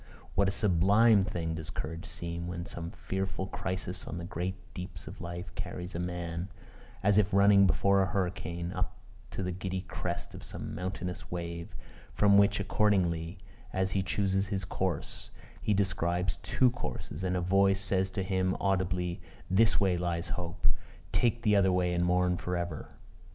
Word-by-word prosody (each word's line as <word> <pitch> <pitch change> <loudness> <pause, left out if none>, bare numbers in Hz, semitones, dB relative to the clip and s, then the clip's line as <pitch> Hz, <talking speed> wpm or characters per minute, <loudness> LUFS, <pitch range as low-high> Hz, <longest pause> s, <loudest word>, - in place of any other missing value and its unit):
what 100 +1 +3
a - - +2
sublime 100 +2 +5
thing 85 -5 -2
does 80 -1 -6
courage 85 0 -5
seem, 85 0 -4
when 85 -1 -4
some 85 -4 -5
fearful 95 +1 -3
crisis 95 -1 -3
on 80 - -4
the 85 - -5
great 90 +1 -3 0.2
deeps 90 -3 -7
of - - -9
life 85 +2 -6
carries 90 +1 -5
a 85 - -3
man, 90 0 -3 0.5
as 100 +1 +5
if 100 -1 +2
running 100 0 +6
before 100 +4 +4
a 95 - +2
hurricane, 90 -2 -2
up 95 0 -2 0.3
to - - -4
the 90 - -1
giddy 95 +1 -3
crest 95 - -4
of - - -9
some - - -6
mountainous 90 0 -4
wave, 85 -1 -5 0.4
from 100 -1 +5
which 100 0 +5
accordingly 90 -4 +1 0.4
as 95 0 +1
he 95 - +1
chooses 95 0 +1
his 95 -1 -2
course, 90 -4 -2 0.3
he - - 0
describes 90 -2 +1
two 130 -2 +2
courses, 115 - -5
and 90 0 +1
a - - +1
voice 95 +2 +3
says 95 -1 +1
to 95 0 -2
him 95 -1 +1
audibly, 90 -2 0 0.3
"This 110 +4 +5
way 95 -3 +3
lies 85 0 -1
hope; 85 -1 -3 0.4
take 120 -1 +2
the 105 -2 +4
other 95 -2 +5
way 90 -1 +2
and 85 0 +1
mourn 90 0 +2
for 90 0 -2
ever!" 85 -4 -4
95 Hz, 170 wpm, -31 LUFS, 85-95 Hz, 0.5 s, running